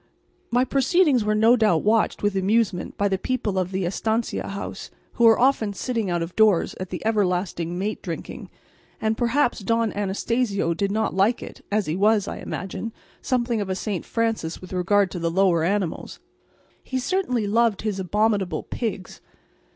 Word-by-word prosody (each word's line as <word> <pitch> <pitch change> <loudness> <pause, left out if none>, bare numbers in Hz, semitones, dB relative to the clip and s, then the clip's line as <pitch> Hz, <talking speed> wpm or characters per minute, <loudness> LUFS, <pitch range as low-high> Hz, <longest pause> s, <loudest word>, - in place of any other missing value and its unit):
My 245 +2 +2
proceedings 275 - +3
were 215 0 +1
no 225 +3 +5
doubt 210 -9 +2
watched 215 0 +1
with 205 -1 +1
amusement 195 -1 0
by 200 - +2
the 190 -1 -1
people 220 -7 -1
of 185 -1 -1
the 190 -1 -1
estancia 220 +5 -1
house, 200 0 -6 0.2
who 235 - +2
were 225 -1 +7
often 240 -5 +2
sitting 225 -2 -2
out 175 -1 0
of 165 +2 -8
doors 215 -5 +3
at 185 -1 -5
the 185 - -6
everlasting 180 -5 0
mate 205 +3 -3
drinking; 170 -3 -7 0.5
and 220 0 0
perhaps 245 +3 +1
Don 230 +2 0
Anastacio 205 -2 0
did 195 +4 -1
not 220 +1 0
like 200 +6 +2
it, - - -11
as 210 -1 +1
he 155 - -2
was, 205 +1 +3
I - - -5
imagine, 195 +4 -5 0.3
something 240 -3 0
of 200 - -4
a 190 - -1
St. 195 -2 -3
Francis 225 -8 -2
with 185 0 -10
regard 190 +2 +2
to 180 - -5
the 170 0 0
lower 175 -2 +2
animals. 190 -1 -2 0.6
He 260 - -3
certainly 255 - 0
loved 220 0 +2
his 210 -3 -2
abominable 205 0 0
pigs. 205 -6 -5
205 Hz, 175 wpm, -24 LUFS, 185-230 Hz, 0.6 s, were